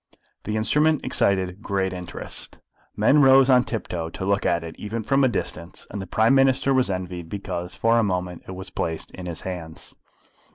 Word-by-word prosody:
The 105 - -2
instrument 150 +7 +2
excited 95 0 +1
great 95 -3 -1
interest. 90 -1 -7 0.4
Men 150 +1 +4
rose 135 0 +6
on 125 -1 +6
tiptoe 90 -9 -4
to 95 - -5
look 100 0 +1
at 85 0 +1
it 80 -1 -8
even 110 +2 -4
from 135 +5 +2
a - - +6
distance, 90 -7 -4
and 100 - -4
the 95 - -7
Prime 110 +7 +3
Minister 135 0 +3
was 130 -4 +2
envied 90 -3 -4
because 90 -3 -5
for 115 +1 +3
a - - +3
moment 90 -3 -2
it 95 - -6
was 95 0 -8
placed 80 -2 -3
in 90 -1 -8
his 85 -2 -4
hands. 85 -4 -7
95 Hz, 190 wpm, -24 LUFS, 90-115 Hz, 0.4 s, rose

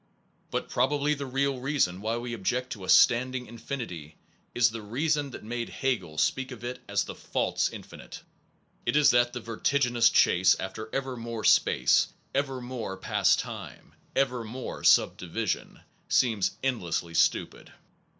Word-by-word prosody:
But - - -3
probably 145 +4 +1
the 140 -2 -5
real 135 0 0
reason 125 -10 0
why 110 +2 -1
we 120 0 -5
object 125 +4 -2
to 100 - -6
a 95 - -7
standing 125 +6 +4
infinity 110 - -7 0.4
is 120 -1 +4
the 115 0 -6
reason 145 +7 -1
that 125 - -9
made 120 +2 -4
Hegel 100 - -2
speak 130 +10 0
of 125 -3 -10
it 125 +1 -5
as - - +1
the - - -7
false - - -1
infinite. - - -11 0.6
It - - -1
is 150 -1 +6
that 120 0 +3
the 125 - -4
vertiginous 120 +1 +2
chase 90 +1 +4
after 110 +4 -6
ever 135 -1 -3
more 115 -2 -6
space, - - +4 0.3
ever 135 -1 -1
more 120 -6 -5
past - - +2
time, - - -8 0.2
ever 125 -3 +1
more 120 +4 -7
subdivision, - - +1 0.3
seems 110 -6 +2
endlessly 85 -10 -2
stupid. 85 - 0
120 Hz, 150 wpm, -28 LUFS, 110-130 Hz, 0.6 s, is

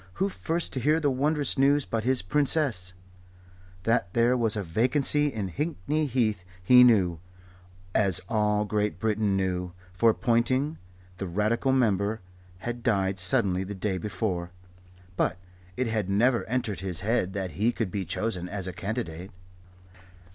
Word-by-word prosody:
Who 195 +2 0
first 170 -2 -2
to 135 - -1
hear 150 +6 +2
the 145 -3 +1
wondrous 145 +1 0
news 140 +1 +4
but 115 -1 -3
his 130 -3 +2
Princess? 130 - +1 0.9
That 115 -4 +1
there 120 +2 +4
was 115 -3 +1
a 105 - -2
vacancy 130 - +2
in 105 -9 -3
Hickney 150 - -2
Heath 110 -7 0 0.2
he 125 +6 +8
knew, 95 -9 +4 0.7
as 95 -5 +1
all 105 -2 +1
Great 105 0 -1
Britain 105 -3 0
knew; 90 -2 -2 0.2
for 115 +5 +4
Ponting, 130 +5 +1 0.4
the 95 - -4
Radical 110 +8 0
Member, 110 -4 +1 0.5
had 120 0 -4
died 95 -5 0
suddenly 95 -1 +1
the 100 +2 -6
day 95 -1 -2
before. 90 -3 -3 0.7
But - - +1 0.4
it 130 - 0
had 110 -4 -1
never 120 +5 +2
entered 120 -3 -2
his 95 -2 -4
head 100 -3 0
that 95 -2 -3
he 105 +10 +1
could 110 -6 -3
be 100 -2 -2
chosen 90 -3 -3
as 100 -1 -4
a 95 - -4
candidate. 90 -3 -5
110 Hz, 150 wpm, -27 LUFS, 95-125 Hz, 0.9 s, he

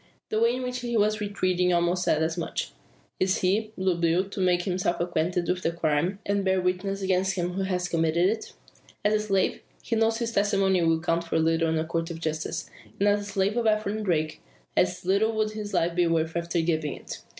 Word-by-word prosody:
The 215 - 0
way 235 +2 +3
in 255 - -4
which 250 0 -3
he 240 -1 -1
was 215 0 +2
retreating 185 -3 +1
almost 175 +1 +2
said 155 -2 +2
as 160 0 -1
much. 170 - -3 0.5
Is 185 0 +2
he, 205 +4 +1
Blue 185 -1 +1
Bill, 170 +3 +1
to 200 - -7
make 180 -1 +2
himself 180 -2 -1
acquainted 175 +1 0
with 180 0 0
the 165 - 0
crime, 170 +3 0
and 200 0 0
bear 190 0 +2
witness 185 +2 -1
against 190 0 +1
him 180 -1 -2
who 195 - -2
has 180 -2 -1
committed 165 +1 +2
it? 220 +3 -3 0.5
As 210 - +4
a 215 - +3
slave, 195 -3 0 0.2
he 230 - -1
knows 225 0 +2
his 230 -1 -2
testimony 195 -3 +2
will 165 -1 +3
count 170 0 0
for 165 - -1
little 165 0 +2
in 160 - +1
a 160 - 0
court 165 +1 -2
of 165 -1 -6
justice. 155 -1 -3 0.3
And 200 - +3
as 205 0 +4
the - - -7
slave 195 +2 +1
of 235 -2 +1
Ephraim 215 0 0
Darke, 155 -5 0 0.4
as 180 0 +1
little 200 +4 +2
would 215 -1 0
his 210 -1 -6
life 170 +1 +1
be 175 0 +2
worth 165 0 0
after 170 0 0
giving 160 -3 -1
it. - - -9
185 Hz, 220 wpm, -26 LUFS, 170-205 Hz, 0.5 s, As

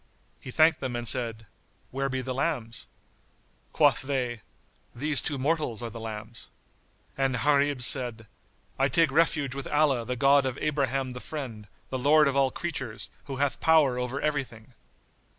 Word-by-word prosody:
He - - -10
thanked 155 +4 +4
them 130 -3 -4
and 120 0 -3
said, 115 -3 -1 0.5
"Where 135 +1 -2
be 130 0 -2
the 130 0 -4
lambs?" 125 -5 -3 0.8
Quoth - - +3
they, 125 -4 -2 0.5
"These 145 +3 +2
two 145 - -1
mortals 140 -4 -1
are 115 - -5
the 115 - -8
lambs." 110 +1 -7 0.7
And 135 -1 0
Gharib 140 +1 +2
said, 120 -3 +1 0.5
"I 135 - +4
take 165 +2 +3
refuge 150 -3 +2
with 140 0 -5
Allah 145 -5 +2
the 125 +2 -3
God 135 +2 +4
of 130 0 -4
Abraham 135 -3 -1
the 125 - -7
Friend, 125 -8 -7 0.2
the 130 - -3
Lord 150 +3 +5
of 140 - 0
all 135 -1 +3
creatures, 130 -8 -4
who 135 -1 -5
hath 140 +1 -1
power 150 -6 +4
over 125 +2 -3
everything!" 130 -6 -3
135 Hz, 160 wpm, -27 LUFS, 120-145 Hz, 0.8 s, Lord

